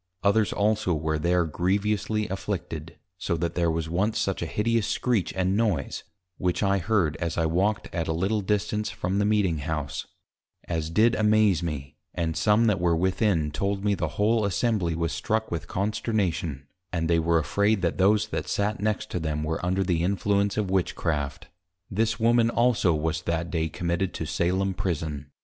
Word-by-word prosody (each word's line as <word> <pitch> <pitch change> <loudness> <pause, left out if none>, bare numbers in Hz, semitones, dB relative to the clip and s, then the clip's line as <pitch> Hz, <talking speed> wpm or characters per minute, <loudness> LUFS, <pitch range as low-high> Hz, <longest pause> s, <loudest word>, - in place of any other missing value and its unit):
Others 105 +1 +3
also 105 -4 +1
were 80 0 -1
there 85 +2 +2
grievously 105 +5 0
afflicted, 85 -4 -5 0.2
so 85 - -1
that 85 0 -2
there 85 -1 +1
was 80 0 -1
once 95 +7 0
such 95 - -1
a 85 - -2
hideous 110 +3 0
scrietch 120 -7 0
and 95 +1 +1
noise 100 - 0 0.4
(which 90 +2 0
I 100 0 +2
heard 90 -5 +1
as 85 -1 -3
I 80 - +2
walked 95 +6 +1
at 85 -2 -2
a - - 0
little 95 +6 0
distance 105 +1 -1
from 95 +3 -2
the 105 - +2
Meeting 100 -7 +2
House) 75 -1 -3 0.6
as 80 -2 -2
did 110 +7 +4
amaze 105 -5 +3
me, 75 -5 -5 0.2
and 80 -2 -1
some 105 +2 +3
that 105 -5 +2
were 85 -1 +2
within, 90 -3 +1
told 100 +6 -2
me 105 - +3
the 85 -4 -1
whole 110 +2 +3
Assembly 100 -4 0
was 85 0 -1
struck 110 0 -1
with 85 -3 -3
Consternation, 95 - -1 0.3
and 80 -2 -1
they 85 0 +3
were 85 +1 +2
afraid, 100 +5 +1
that 85 - 0
those 105 +3 +3
that - - -3
sate 105 +1 -1
next 105 0 -1
to 90 - -1
them 75 -2 -2
were 80 +2 -2
under 95 +2 +1
the 85 -3 0
Influence 100 +2 +1
of 100 -3 -1
Witchcraft. 80 -6 -1 0.4
This 110 +3 0
Woman 115 0 +4
also 120 -6 +3
was 80 +1 -1
that 85 0 -2
day 80 -1 0
committed 85 +2 -2
to - - -3
Salem 95 +3 0
Prison. 75 -6 -3
95 Hz, 180 wpm, -26 LUFS, 80-105 Hz, 0.6 s, did